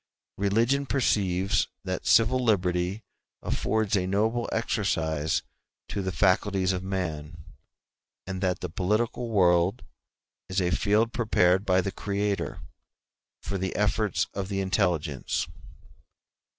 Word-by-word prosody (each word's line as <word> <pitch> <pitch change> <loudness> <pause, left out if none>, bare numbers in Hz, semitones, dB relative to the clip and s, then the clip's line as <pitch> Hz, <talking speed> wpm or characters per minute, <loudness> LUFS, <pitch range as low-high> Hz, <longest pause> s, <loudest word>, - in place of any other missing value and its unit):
Religion 115 +8 +2
perceives 100 -6 +1 0.2
that 95 -1 -4
civil 125 +3 +4
liberty 90 -2 +1 0.4
affords 110 -1 0
a 90 -2 0
noble 110 +5 0
exercise 80 -9 0 0.4
to 100 - -3
the 95 -1 -2
faculties 95 0 +2
of 90 - -2
man, 80 -5 -4 0.8
and 95 0 -5
that 90 -2 0
the 90 - -2
political 110 +7 -1
world 90 +1 +3 0.7
is 95 +1 0
a 90 -1 +1
field 105 +5 +2
prepared 100 -5 +2
by 95 0 +4
the 95 - -3
Creator 100 0 -2 0.8
for 100 - -3
the 95 0 -3
efforts 105 -4 +1
of 95 -1 -4
the 100 -1 -2
intelligence. 85 -7 0
95 Hz, 115 wpm, -27 LUFS, 90-105 Hz, 0.8 s, civil